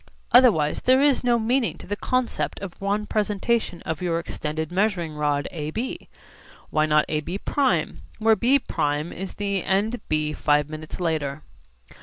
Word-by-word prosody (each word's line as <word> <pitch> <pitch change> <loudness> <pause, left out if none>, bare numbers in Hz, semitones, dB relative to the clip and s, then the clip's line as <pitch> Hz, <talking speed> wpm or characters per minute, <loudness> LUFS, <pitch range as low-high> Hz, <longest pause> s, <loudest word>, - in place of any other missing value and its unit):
Otherwise 210 - +5
there 255 +1 +4
is 280 -2 +3
no 240 -1 +3
meaning 235 +2 0
to - - -11
the 205 - -3
concept 235 - -1
of 195 -2 -8
one 205 +2 0
presentation 210 -2 -1
of 160 0 -4
your 170 -2 0
extended 160 -1 -4
measuring 180 -4 0
rod 145 -1 0
AB. 165 +10 -4 0.6
Why 155 0 +2
not 150 0 +4
AB′ 155 +5 -2 0.8
where 220 0 +4
B′ 255 +5 +3 0.5
is 190 +2 -6
the 200 -2 -1
end 210 +5 0
B 155 0 0
five 150 -1 +2
minutes 155 +2 -7
later? 155 -4 -2
185 Hz, 145 wpm, -24 LUFS, 155-220 Hz, 0.8 s, Otherwise